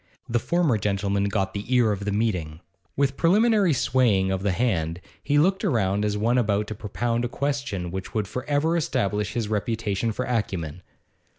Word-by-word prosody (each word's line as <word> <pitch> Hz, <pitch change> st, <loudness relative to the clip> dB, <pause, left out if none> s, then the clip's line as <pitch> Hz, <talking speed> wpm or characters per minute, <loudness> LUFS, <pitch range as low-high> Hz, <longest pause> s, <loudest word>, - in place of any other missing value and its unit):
The 120 Hz, 0 st, +1 dB
former 160 Hz, -5 st, +1 dB
gentleman 100 Hz, 0 st, 0 dB
got 100 Hz, -1 st, -1 dB
the 100 Hz, +4 st, -6 dB
ear 120 Hz, -3 st, +4 dB
of 100 Hz, -1 st, -3 dB
the 105 Hz, -, 0 dB
meeting. 90 Hz, -7 st, -1 dB, 0.3 s
With 140 Hz, -1 st, +1 dB
preliminary 205 Hz, +1 st, +4 dB
swaying 120 Hz, -8 st, +2 dB
of 95 Hz, -1 st, -1 dB
the 100 Hz, 0 st, +1 dB
hand, 85 Hz, -5 st, 0 dB, 0.2 s
he 145 Hz, 0 st, +1 dB
looked 190 Hz, +7 st, +3 dB
round 105 Hz, -, +1 dB
as 105 Hz, 0 st, 0 dB
one 115 Hz, +4 st, +2 dB
about 105 Hz, -2 st, +1 dB
to -, -, -3 dB
propound 115 Hz, +3 st, -2 dB
a -, -, 0 dB
question 135 Hz, -11 st, -2 dB
which 95 Hz, +1 st, -5 dB
would 105 Hz, -3 st, 0 dB
for 125 Hz, +5 st, -5 dB
ever 150 Hz, +3 st, +1 dB
establish 105 Hz, -, -1 dB
his 115 Hz, -3 st, -1 dB
reputation 110 Hz, 0 st, -1 dB
for 125 Hz, +4 st, -3 dB
acumen. 90 Hz, -9 st, -2 dB
110 Hz, 180 wpm, -25 LUFS, 100-130 Hz, 0.3 s, ear